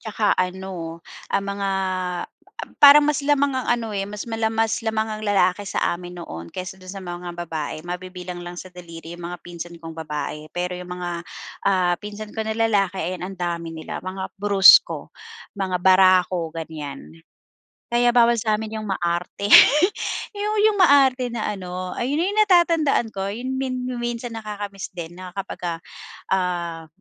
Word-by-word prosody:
saka 215 0 -1
ano, 180 -3 -3 0.3
ah, 195 - 0
mga 200 0 -3 1.1
parang 290 +1 +10
mas 295 -1 +1
lamang 285 -1 +2
ang 260 - -2
ano, 230 -3 -1
eh, 195 - -1
mas 210 0 -6
mala 225 -1 0
mas 225 +1 0
lamang 220 -1 0
ang 215 0 -5
lalaki 200 -1 +2
sa - - -2 0.2
amin 175 0 -9
noon 85 - -8
kaysa 185 0 -6
doon 185 - -9
sa 195 0 -8
mga 175 0 -6 0.2
babae, 155 -1 -4
mabibilang 180 0 -6
lang 175 0 -8
sa 185 - -8
daliri 170 -1 -10
iyong 175 - -11
mga 180 - -6
pinsan 175 0 -8
kong 165 -1 -9
babae. 150 -1 -5
Pero 180 0 -3
iyong 180 0 -8
mga, 180 -1 -4 0.6
ah, 180 -2 +3
pinsan 210 +1 -8
ko 220 - -1
na 220 0 -3
lalaki 200 -4 +2
ayan 180 +1 -3
ang 190 +1 -6
dami 170 -2 -3
nila 160 -1 -7
mga 190 0 -4
brusko, 200 -1 +6 0.4
mga 190 -2 -1
barako, 185 -2 +4
ganyan. 150 - -8 0.7
Kaya 240 0 +4
bawal 235 0 +6
sa 215 -1 +1
amin 220 0 -5
iyong 215 - -6
maarte. 175 +2 -2 0.8
Iyong 420 +1 -2
iyong 425 -2 +3
maarte 270 -6 +5
na 230 -3 -2
ano 185 -2 -5
ayun 275 +5 -1
iyong 410 +3 0
natatandaan 335 - +3
ko, 195 0 -2
iyon 255 +4 -4
min 255 -1 -2 0.2
minsan 240 0 -3
nakaka-miss 205 -2 -6
din 170 -1 -7
na 185 0 -9
kapagka, 175 -3 -4 0.5
ah, 175 -3 -1
190 Hz, 160 wpm, -23 LUFS, 175-225 Hz, 1.1 s, parang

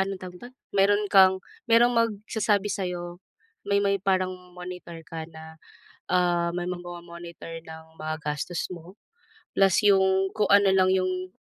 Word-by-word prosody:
anong 195 0 -1
tawag 180 -1 -8
dito? 245 - -9 0.3
Mayro'n 205 +2 +3
kang, 190 -1 +6 0.3
meron 235 +2 +6
magsasabi 210 -2 0
sa'yo, 175 -2 -4 0.5
may 200 0 +2
may 200 0 +1
parang 185 -1 +1 0.2
monitor 180 -1 -8
ka 160 -1 -6
na, 160 0 -12 0.5
ah, 175 -1 +2
may 175 - -2
mag-momonitor 170 -1 -8
ng 160 0 -13
mga 155 0 -3
gastos 150 +4 -3
mo. 175 +3 -11 0.6
Plus 195 -2 +4
'yong 190 -1 +4
kung 210 -2 +1
ano 200 0 +6
lang 185 -1 +4
'yong 185 0 -1
185 Hz, 140 wpm, -26 LUFS, 175-195 Hz, 0.6 s, kang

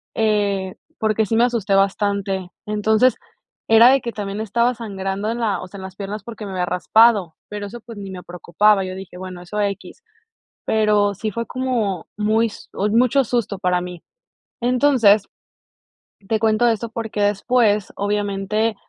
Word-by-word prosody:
eh, 205 -3 0 0.2
porque 220 0 +1
sí 225 +2 0
me 235 - +5
asusté 225 -5 0
bastante. 195 -1 0
Entonces 215 +4 +2 0.5
era 225 +2 +8
de 270 0 +4
que, 235 - -4
también 205 -1 -5
estaba 235 +3 +1
sangrando 200 -1 -3
en 235 - -4
la, 220 -4 0
o - - -8
sea, 200 - -11
en 190 - -8
las 190 0 -9
piernas 200 +1 -6
porque, 225 -1 -8
me 200 - -6
había 180 -1 -1
raspado, 195 -1 +3
pero 205 -1 -5
eso, 240 +4 -9
pues, 230 -2 -11
ni 200 -1 -7
me 180 -1 -8
preocupaba. 195 +4 +2
Yo 185 0 -6
dije, 190 -1 -10
bueno, 185 -1 -8
eso 200 +4 -5
equis, 200 - -4 0.6
pero 210 -2 +2
sí 215 +2 -3
fue 230 +4 -3
como 235 -9 -2
muy 215 +2 +2
s 215 - -11
mucho 235 +7 +2
susto 230 -4 -1
para 180 -2 +1
mí. 180 -1 -8 0.6
Entonces, 245 -5 +4 1.0
te 220 - +1
cuento 220 +1 +2
esto 230 0 0
porque 225 -2 -4
después, 205 0 +2
obviamente, 205 +2 -1
210 Hz, 165 wpm, -21 LUFS, 195-225 Hz, 1.0 s, era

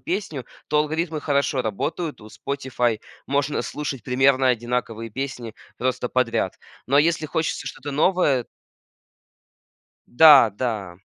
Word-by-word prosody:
песню, 175 -8 -4 0.2
то 150 - +2
алгоритмы 155 +1 -1
хорошо 140 -2 0
работают. 145 - -3
У 105 - -13
Spotify 125 -4 -2 0.3
можно 140 +1 0
слушать 140 -4 -5
примерно 130 +1 +3
одинаковые 120 -2 -2
песни 125 -2 -5 0.2
просто 125 -1 -1
подряд. 125 -2 0 0.3
Но 140 +3 +3
если 160 +1 +2
хочется 155 +1 -2
что-то 145 +1 -6
новое 150 -4 +2 1.7
Да, 140 -4 +7
да. 100 -5 -4
135 Hz, 115 wpm, -23 LUFS, 120-150 Hz, 1.7 s, Да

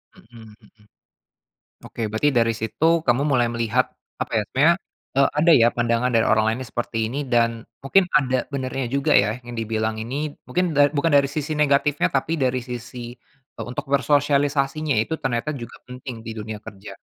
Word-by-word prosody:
Mhm 110 -2 -15
mhm. 110 - -24 1.0
Oke - - -10
berarti 110 +7 +1
dari 115 -1 +3
situ 110 +7 -3 0.2
kamu 120 +3 +3
mulai 130 -5 +2
melihat, 115 +2 +1 0.3
apa - - -4
ya, - - +2
sebenernya, - - +4 0.4
eee, 140 +1 +4
ada 165 +3 +4
ya 115 -4 +6
pandangan 120 +1 0
dari 115 -2 +2
orang 110 0 +3
lain 115 - -2
yang - - -15
seperti 120 -1 -3
ini, 135 +6 -3
dan 115 -1 +2 0.2
mungkin 185 +8 +3
ada 130 -3 0
benarnya 135 -2 -3
juga 140 +3 +1
ya 110 +2 +3
yang 120 - -7
dibilang 110 -1 -2
ini. 145 +6 -4
Mungkin 180 -3 -1
da 145 0 +5
bukan 150 +2 0
dari 140 -1 +4
sisi 150 +1 -3
negatifnya, 150 0 +2
tapi 140 +4 0
dari 130 -4 0
sisi, 120 0 -7 0.4
eee, - - -5
untuk 125 - -5
bersosialisasinya 145 +1 +1
itu 115 +9 0
ternyata 135 +3 -1
juga 120 -4 -8
penting 125 -1 -8
di - - -4
dunia 110 -1 -6
kerja. 100 -1 -10
130 Hz, 175 wpm, -22 LUFS, 115-145 Hz, 1.0 s, ya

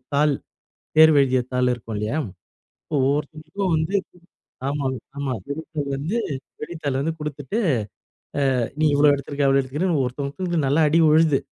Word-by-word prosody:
தாள், 145 +1 +3 0.6
தேர்வு 155 -1 +8
எழுதிய 130 -1 +2
தாள் 125 0 +2
இருக்கும் 115 -2 -8
இல்லையா, 105 +8 -1 0.8
ஒவ்வொருத்தவங்களுக்கும் 155 +6 -1
வந்து 160 +5 -1 0.7
ஆமா, 140 0 -2 0.3
ஆமா. 140 -2 -2
விடைத்தாள் 150 -1 -4
வந்து 155 +12 -2 0.4
விடைத்தாள் 150 -4 -3
வந்து 160 +3 -1
கொடுத்துட்டு 150 +5 -4 1.0
அ - - +2 0.2
நீ 155 - +3
இவ்வளோ 145 +1 +6
எடுத்திருக்க, 140 0 -1
அவ்வளோ 135 0 +4
எடுத்துக்கிற 150 +8 -1
ஒருத்தவங்களுக்கு 145 +5 -2
நல்லா 150 +3 +3
அடி 165 +3 +4
விழுது. 155 -2 +4
145 Hz, 130 wpm, -23 LUFS, 135-160 Hz, 1.0 s, தேர்வு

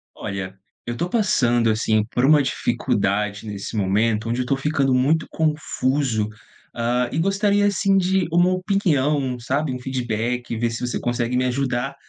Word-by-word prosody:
Olha, 95 -1 -5 0.3
eu 120 - -4
tô 175 +8 -2
passando, 120 - +2
assim, 110 0 +2
por 125 - +1
uma 150 +1 +6
dificuldade 105 -5 -1
nesse 100 +2 -6
momento, 105 +3 +1
onde 120 +2 0
eu - - -2
tô 135 - +1
ficando 140 -1 +1
muito 145 +6 +2
confuso. 140 -7 0 0.5
Hã, 120 +1 0
e - - -3
gostaria, 200 +3 +2
assim, 200 0 +2
de 190 -1 +1
uma 175 +2 +4
opinião, 150 -9 0
sabe, 135 +4 -1
um 125 - -5
feedback, 120 -2 -2
ver 115 +1 0
se 115 - -5
você 120 - -2
consegue 120 0 -1
me 125 - +1
ajudar 130 +1 -1
125 Hz, 160 wpm, -22 LUFS, 115-155 Hz, 0.5 s, uma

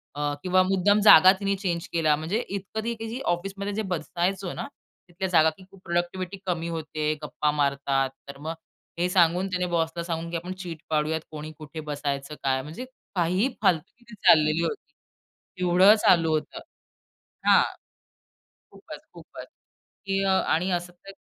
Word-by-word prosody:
अ, 145 0 -1
किंवा 185 0 +3
मुद्दाम 195 +2 +3
जागा 185 -3 +9
तिने 200 0 0
चेंज 175 -4 -3
केल्या. 155 -3 +3
म्हणजे 165 +9 -2
इतकं 200 +2 -5
ते 230 +1 -4
ऑफिसमध्ये 200 +4 -3
बसायचो 180 +2 -2
ना, - - -5 0.4
तिथल्या 190 +2 -3
जागाची 160 +1 +3
खूप 195 -1 -17
प्रॉडक्टिव्हिटी 175 +2 -2
कमी 170 -2 -2
होते. 155 -2 -2
गप्पा 150 0 -1
मारतात. 140 -2 0 0.2
तर 140 - -8
मग 160 +3 -5 0.5
हे 180 +1 +1
सांगून 180 0 +3
तिने 180 0 0
बॉसला 165 +1 -1
सांगून 165 -1 -4
की - - -4
आपण 180 +2 -6
चीट 165 -3 -7
पाडूयात. 155 +1 0
कोणी 155 0 -7
कुठे 155 +1 -9
बसायचं 140 0 -3
काय 130 -1 +1
म्हणजे 160 - -8 0.3
काहीही 185 +8 +1
फालतूगीरी 215 +5 -1
चाललेली 155 +1 +5
होती. 430 - -5 0.7
येवढं 180 +4 +6
चालू 165 -3 +5
होतं. 155 - -3 0.9
हां. - - +7 1.1
खूपच, - - -11
खूपच - - -11 0.6
की 195 0 0
अ, 195 - +2
आणि 185 -1 +1
अ, 175 - +2
असं 175 +1 -7
तर 195 - -9
175 Hz, 150 wpm, -26 LUFS, 155-190 Hz, 1.1 s, जागा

